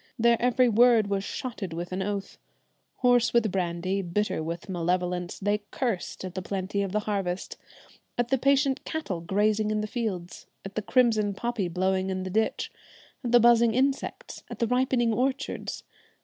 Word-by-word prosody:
Their 235 0 +3
every 250 +1 +4
word 230 -2 +5
was 195 -1 0
shotted 210 -7 -5
with 175 +2 -5
an 185 +1 -2
oath. 200 0 -4 0.6
Hoarse 245 -1 +4
with 230 -4 +3
brandy, 185 +1 -1
bitter 190 0 -1
with 165 +4 -5
malevolence, 180 0 -1
they 205 +1 0
cursed 230 -7 -3
at 185 - -6
the 185 - -4
plenty 195 +1 -2
of 195 -2 -2
the 210 +2 0
harvest, 195 -4 -3 0.6
at 240 0 0
the 270 0 +2
patient 275 0 +2
cattle 230 - -4
grazing 210 +4 +1
in 215 0 0
the - - -2
fields, 205 -7 -4 0.2
at 195 - -7
the 220 - -2
crimson 215 -3 +2
poppy 235 -3 -2
blowing 185 +2 0
in 185 0 -2
the 185 - -5
ditch, 220 +3 0 0.5
at 240 - -2
the 240 - +7
buzzing 235 -1 +5
insects, 270 +2 -1
at - - -7
the 235 - +1
ripening 250 -1 +2
orchards. 260 +4 -2
210 Hz, 170 wpm, -27 LUFS, 185-240 Hz, 0.6 s, the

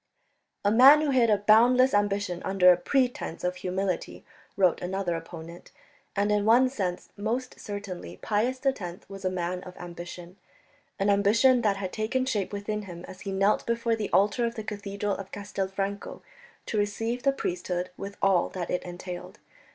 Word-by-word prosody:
"A 205 - +4
man 270 +7 +8
who 300 -2 +1
hid 245 -3 +4
a 210 - +4
boundless 240 +6 +5
ambition 205 -3 0
under 185 -2 +5
a - - +6
pretence 245 - -1
of 180 0 -1
humility," 185 0 -3 0.3
wrote 185 -3 +3
another 180 -1 -2
opponent. 165 +1 -9 0.4
And 205 +1 +1
in 210 -1 +2
one 240 +4 +5
sense 190 -9 -3
most 235 +5 -3
certainly 200 -3 -7
Pius 235 +5 0
X 185 -10 -2
was 195 0 -10
a - - +3
man 180 0 -3
of 180 0 -11
ambition, 175 +1 -9 0.6
an 200 +1 +2
ambition 225 +6 +4
that 205 -4 +1
had 190 -2 -5
taken 230 +4 -1
shape 210 -7 -1
within 210 +1 -3
him 175 0 -8
as 185 - -11
he 200 - -5
knelt 195 +2 +2
before 235 0 +1
the 215 -2 -3
altar 205 +5 +3
of 235 0 -1
the 220 - -5
cathedral 205 -1 -3
of 195 -1 -8
Castelfranco 200 0 -4 0.4
to 215 - -3
receive 225 +4 -1
the 275 - +3
priesthood 180 -6 -3
with 200 +1 -7
all 190 -3 +3
that 175 -3 -5
it 180 - 0
entailed. 180 0 -8
200 Hz, 170 wpm, -27 LUFS, 180-225 Hz, 0.6 s, man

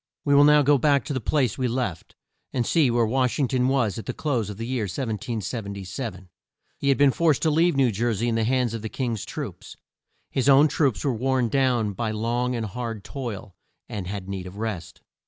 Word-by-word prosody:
We 145 - +3
will 145 +1 +7
now 150 0 +6
go 145 0 +4
back 140 0 +3
to 150 - -3
the 130 - -2
place 130 -2 0
we 130 - +1
left, 115 -8 -3 0.4
and 120 -2 -1
see 155 -2 +3
where 120 -1 +2
Wash 125 +2 +1
ing 140 - +2
ton 125 0 +1
was 120 -7 +1
at - - -9
the - - -3
close 125 -9 -1
of 105 - -7
the 115 - -4
year 125 -3 -1
1777. 100 -2 -4 0.5
He 140 - 0
had 135 - +4
been 140 -1 +5
forced 160 -1 +2
to 160 - +3
leave 165 +1 +3
New 135 -3 +3
Jer 115 +4 0
sey 115 +4 -1
in 115 - +1
the 115 0 +1
hands 125 0 +1
of 115 - -4
the 110 - -5
King's 120 -5 -3
troops. - - -7 0.5
His 135 +1 +1
own 140 +3 +7
troops 135 - +1
were 135 - +2
worn 125 +1 0
down 125 -5 +1
by 115 +2 -2
long 120 +3 -1
and 115 -2 -2
hard 115 0 -5
toil, 115 -9 -6 0.3
and 100 -4 -5
had 100 -1 -5
need 95 -2 -5
of 95 +2 -10
rest. 105 -6 -5
120 Hz, 220 wpm, -25 LUFS, 110-135 Hz, 0.5 s, will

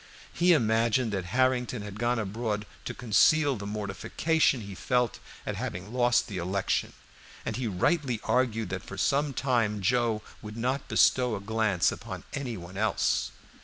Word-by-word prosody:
He 175 +1 +4
imagined 115 -2 +2
that 95 -3 -2
Harrington 125 +2 +1
had 105 0 -8
gone 120 +1 +1
abroad 105 0 -2 0.2
to - - -3
conceal 140 +5 +4
the 100 -2 -6
mortification 110 +8 0
he 100 -1 -8
felt 125 +4 0 0.3
at - - -3
having 95 +6 -5
lost 120 -1 +3
the 95 -3 -4
election, 95 +3 -1 0.5
and - - -2
he 125 -2 -2
rightly 120 - +1
argued 115 -4 +1
that - - -3
for - - -9
some 145 +1 +1
time 120 -6 0
Joe 115 +1 +1 0.2
would 105 +1 -8
not 130 +4 -1
bestow 125 -3 +3
a - - -4
glance 105 -3 +1
upon - - -7
any 125 -5 -3
one 90 +2 -9
else. 110 +2 +1
115 Hz, 160 wpm, -28 LUFS, 105-125 Hz, 0.5 s, He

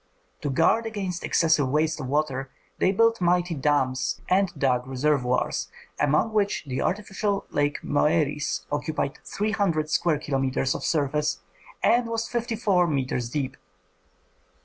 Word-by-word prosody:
To 145 - -2
guard 190 +11 +2
against 195 -5 -4
excessive 155 -5 +2
waste 155 +2 +1
of 130 - -4
water, 135 -2 -1 0.3
they 185 - +3
built 230 +2 +3
mighty 175 0 +2
dams 130 -3 0
and 190 0 +2
dug 125 -2 +1
reservoirs, 130 -1 0 0.3
among 150 +10 +2
which 205 -2 +1
the 130 -2 -3
artificial 200 0 -1
lake 145 0 0
Moeris 150 0 +1
occupied 145 -1 -2
three 210 +2 -2
hundred 165 -8 0
square 160 -1 +2
kilometres 135 -2 0
of - - -5
surface 150 - 0 0.4
and 240 0 +4
was 230 0 -2
fifty 235 -1 -2
four 195 -6 +2
metres 130 -5 -1
deep. 135 0 -3
155 Hz, 135 wpm, -25 LUFS, 135-195 Hz, 0.4 s, and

